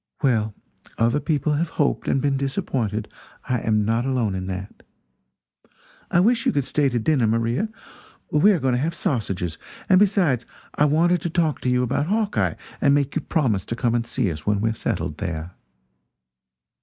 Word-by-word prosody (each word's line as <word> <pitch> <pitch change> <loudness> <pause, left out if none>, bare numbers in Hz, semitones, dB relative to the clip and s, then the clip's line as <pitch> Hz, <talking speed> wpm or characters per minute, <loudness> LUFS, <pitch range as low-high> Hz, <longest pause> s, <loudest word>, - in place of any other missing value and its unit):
Well, 110 -6 +1 0.4
other 115 +5 +2
people 150 0 0
have 155 +3 0
hoped 145 -3 0
and - - +2
been 140 0 +1
disappointed; 130 - -2 0.3
I 125 -1 +1
am 105 -2 +1
not 115 +2 +1
alone 125 -6 0
in 95 0 -4
that. 95 +1 -6 1.3
I 175 - +3
wish 230 +5 +3
you - - +4
could 140 - 0
stay 140 +2 +1
to 120 - -1
dinner, 125 0 +2
Maria 115 - 0 0.6
we 150 +8 +5
are 185 - +2
going 135 -1 +1
to 125 - +1
have 165 +3 -1
sausages; 95 - -2 0.3
and 185 - +6
besides, 180 - +3 0.3
I 150 - +3
wanted 165 +3 +3
to 170 - -2
talk 160 -3 0
to 125 - 0
you 125 0 +2
about 135 +4 0
Hawkeye 210 +1 0 0.3
and 140 -1 +5
make 145 0 0
you - - 0
promise 120 - 0
to 115 - -3
come 120 -1 0
and 120 0 0
see 120 -9 0
us 75 -1 -7
when 105 -1 +1
we 110 +2 +1
are - - -2
settled 80 -7 -3
there." 85 -3 -4
130 Hz, 185 wpm, -23 LUFS, 110-155 Hz, 1.3 s, and